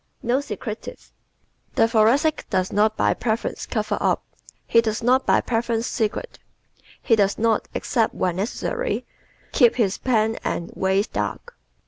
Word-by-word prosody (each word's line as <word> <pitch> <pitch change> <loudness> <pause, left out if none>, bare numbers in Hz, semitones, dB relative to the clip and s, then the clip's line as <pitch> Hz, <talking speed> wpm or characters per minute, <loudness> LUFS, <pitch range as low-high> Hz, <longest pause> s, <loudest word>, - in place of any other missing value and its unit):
Not 255 +4 +1
Secretive 225 -6 -6 0.8
¶ - - -31
The 225 - +4
Thoracic 235 +8 +2
does 185 -1 0
not 215 +1 +2
by - - +3
preference 225 -1 -2
cover - - -1
up; - - +1 0.4
he 230 - +4
does 220 0 -2
not 255 +2 +3
by - - +4
preference 230 -1 -1
secrete; 225 - -3 0.6
he 230 - +4
does 200 -2 +2
not, 225 -1 +1
except 225 -2 0
when 180 -1 -1
necessary, 470 - -2 0.5
keep 240 -5 +4
his 205 -6 0
plans 225 -3 +1
and 170 - -3
ways 190 +2 +1
dark. 480 - -4
225 Hz, 145 wpm, -23 LUFS, 210-245 Hz, 0.8 s, The